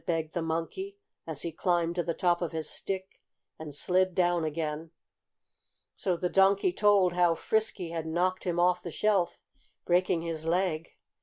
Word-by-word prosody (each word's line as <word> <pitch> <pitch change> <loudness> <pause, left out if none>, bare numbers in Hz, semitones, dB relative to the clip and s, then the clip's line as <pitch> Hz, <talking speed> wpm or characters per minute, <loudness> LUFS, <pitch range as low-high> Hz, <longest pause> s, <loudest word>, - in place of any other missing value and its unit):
begged 165 -2 -1
the 170 - -1
Monkey, 165 - -3 0.3
as 155 -3 -2
he 170 - -3
climbed 170 0 0
to 175 - 0
the 170 -1 -2
top 175 -1 +2
of 170 -1 -2
his 160 -1 -2
stick 190 -1 -4 0.4
and 150 -3 -7
slid 185 +3 +2
down 175 -2 +2
again. 155 0 -3 1.1
So 180 -3 -1
the 180 - 0
Donkey 195 - +3
told 200 - +4
how 175 -1 +3
Frisky 215 -3 0
had 165 -1 -4
knocked 180 +3 0
him 175 -1 0
off 180 0 +3
the 175 - -6
shelf, 195 0 +1 0.5
breaking 175 -1 +2
his 165 -2 -4
leg. 170 -2 -1
175 Hz, 165 wpm, -29 LUFS, 165-185 Hz, 1.1 s, told